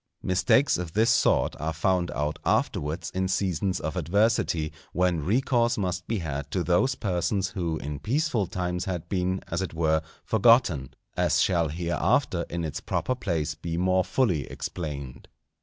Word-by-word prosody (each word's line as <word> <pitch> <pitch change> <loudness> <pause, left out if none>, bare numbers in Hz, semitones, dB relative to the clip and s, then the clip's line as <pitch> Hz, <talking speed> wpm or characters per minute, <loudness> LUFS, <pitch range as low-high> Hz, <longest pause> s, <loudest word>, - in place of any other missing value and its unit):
Mistakes 95 +9 +3
of 85 -3 -5
this 110 +3 +4
sort 120 - +3
are 80 +1 -2
found 90 +2 +1
out 75 +1 -2
afterwards 80 +4 0
in 95 0 -1
seasons 95 0 0
of 80 +3 -4
adversity, 90 -3 +1 0.2
when 90 -3 +1
recourse 120 - +2
must 90 -3 -2
be 115 - -1
had 70 -5 -4
to 90 +1 -1
those 90 - +2
persons 95 -1 -1
who 85 -4 -2
in 75 -2 -5
peaceful 125 - 0
times 90 0 -2
had 90 -4 -4
been, 95 0 0
as 85 +3 -1
it 95 -4 -4
were, 80 -1 +2 0.2
forgotten, 105 - +3 0.2
as - - +2
shall 85 -3 +2
hereafter 85 +2 0
in 85 0 -3
its 80 - -4
proper 130 - -1
place 85 - -2
be 85 +1 -5
more 95 +1 +2
fully 95 - +1
explained. 70 -6 -6
90 Hz, 155 wpm, -26 LUFS, 80-100 Hz, 0.2 s, this